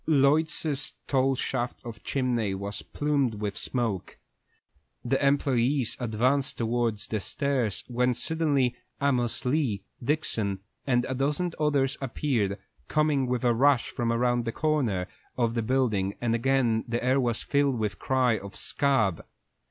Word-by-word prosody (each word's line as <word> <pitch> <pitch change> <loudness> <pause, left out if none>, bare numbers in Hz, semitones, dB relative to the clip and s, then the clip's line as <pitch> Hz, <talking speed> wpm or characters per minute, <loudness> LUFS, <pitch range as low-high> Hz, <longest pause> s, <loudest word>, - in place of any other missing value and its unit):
Lloyd's 150 0 +2
tall 135 0 +2
shaft 125 -1 -2
of 110 -3 -8
chimney 120 -7 0
was 100 +2 -4
plumed 140 -6 0
with 105 -1 -3
smoke. 115 -7 -3 0.9
The 135 +2 +2
employés 135 -2 +2
advanced 125 +4 +1
towards 115 -2 0
the 110 - -1
stairs, 125 -3 -1
when 125 0 +1
suddenly 140 -5 +1 0.2
Amos 125 -5 0
Lee, 125 -7 0 0.2
Dixon, 110 -9 0 0.3
and 125 -1 +2
a 130 - -2
dozen 145 +7 0
others 145 -3 +1
appeared, 115 -6 -1 0.3
coming 150 -4 +2
with 125 0 -1
a 120 -1 +4
rush 135 +1 +3
from 115 -1 -1
around 120 0 +1
a - - 0
corner 125 -12 0 0.3
of 115 -2 +1
the 115 - 0
building, 110 -5 0
and 120 -2 0
again 115 -2 +2
the 120 0 -2
air 130 +2 +3
was 120 -3 0
filled 140 -3 +1
with 105 -2 0
the 100 - -17
cry 125 -4 +2
of 100 0 -10
"Scab!" 110 - +1
125 Hz, 145 wpm, -27 LUFS, 115-140 Hz, 0.9 s, a